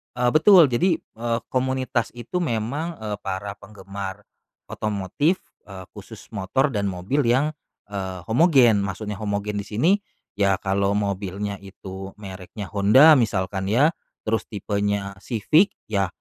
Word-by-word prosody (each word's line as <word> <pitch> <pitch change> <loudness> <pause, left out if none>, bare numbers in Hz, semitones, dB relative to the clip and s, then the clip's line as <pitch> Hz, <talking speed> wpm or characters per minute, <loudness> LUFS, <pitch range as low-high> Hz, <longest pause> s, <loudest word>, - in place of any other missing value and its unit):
Eee, 125 0 +2
betul. 160 -1 +7
Jadi, 170 +9 +3
eee, 115 -3 -4
komunitas 130 -2 0
itu 120 +9 -4
memang, 150 +3 -2
eee, 105 -1 -4
para 100 0 -4
penggemar 100 -1 -8 0.5
otomotif, 110 - -1 0.2
eee, 95 -2 -9
khusus - - -12
motor 115 +8 0
dan 100 -4 -1
mobil 95 +9 -2
yang, 135 +6 +3 0.4
eee, 95 -3 -5
homogen. 120 - +4
Maksudnya 100 +1 -4
homogen 105 0 -2
di 100 - -6
sini, 120 - +2 0.5
ya 100 -1 +4
kalo 100 +1 0
mobilnya 100 0 -2
itu 95 0 -9
mereknya 95 -1 -9
Honda 130 +10 +7
misalkan 95 -4 -1
ya, 135 +10 +4 0.3
terus 110 +1 -1
tipenya 100 -2 -2
Civic, 150 - +2 0.2
ya 100 -2 +1
105 Hz, 130 wpm, -23 LUFS, 100-125 Hz, 0.5 s, betul